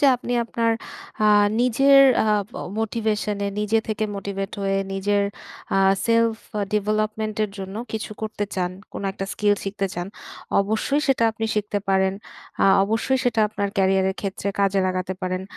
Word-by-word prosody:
যে 290 - +5
আপনি 245 0 -5
আপনার 230 0 0 0.5
আ - - +4 0.4
নিজের 270 +3 +5 0.2
আ - - 0 0.6
মোটিভেশনে 215 -2 -1
নিজে 210 +2 +2
থেকে 215 0 -1
মোটিভেট 195 0 -4
হয়ে 195 0 +1 0.2
নিজের 200 +1 +1 0.5
আ - - +3 0.3
সেলফ 230 -1 +3 0.4
ডেভেলপমেন্ট 215 +1 -1
এর 210 - -6
জন্য 190 +1 -6 0.2
কিছু 220 0 -4
করতে 215 -1 -2
চান, 180 -1 -1 0.2
কোন - - -6
একটা 195 - -5
স্কিল 205 -1 +2
শিখতে 195 0 -2
চান 175 0 -3 0.5
অবশ্যই 220 +8 0
সেটা 260 -4 +3
আপনি 225 0 -4
শিখতে 210 -1 -1
পারেন। 190 0 +2 0.5
আ - - +5 0.2
অবশ্যই 225 +5 0
সেটা 235 -2 +2
আপনার 205 -1 -2
ক্যারিয়ারের 190 0 +2
ক্ষেত্রে 195 0 -3
কাজে 195 0 +2
লাগাতে 185 0 -2
পারেন। 185 0 -2
210 Hz, 150 wpm, -23 LUFS, 195-225 Hz, 0.6 s, যে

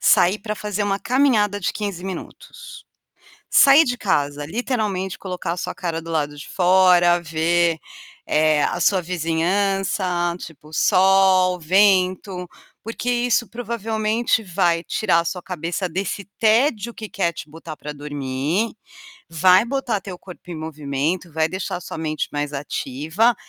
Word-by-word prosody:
sair 185 +4 +4
para 215 0 -4
fazer 210 -1 -3
uma 200 -1 0
caminhada 235 -6 +2
de 185 - -1
15 200 -4 -5
minutos. 485 - -9 0.7
Sair 280 +3 +7
de 250 -4 -2
casa, 145 -8 -1
literalmente, 205 - -2
colocar 180 -3 -4
a - - -8
sua - - -4
cara 165 -2 -3
do 165 - -10
lado 150 -2 -1
de 145 - -10
fora, 180 -1 +4
ver, 165 +1 +1 0.5
eh, 155 -1 +2
a - - -1
sua 195 - +3
vizinhança, 180 +1 0
tipo, 155 -2 -12
sol, 185 +1 +4
vento, 185 0 +2 0.3
porque 230 +2 -4
isso 240 -1 +1
provavelmente 225 -1 -1
vai 175 -3 +1
tirar 180 0 +1
a 170 - -2
sua 180 +2 -3
cabeça 175 +1 -3
desse 190 +3 -4
tédio 230 0 +2
que 215 - -7
quer 180 -4 -1
te 155 - -9
botar 160 0 -10
para 150 - -7
dormir, 145 - -2 0.5
vai 185 +5 +4
botar 250 -4 -1
teu 190 -2 -8
corpo 180 0 -13
em - - -5
movimento, 155 +2 -3
vai 160 0 +1
deixar 185 +1 -4
a - - -10
sua - - -7
mente 155 -1 -3
mais 145 0 -3
ativa, 150 - 0
185 Hz, 145 wpm, -21 LUFS, 165-210 Hz, 0.7 s, Sair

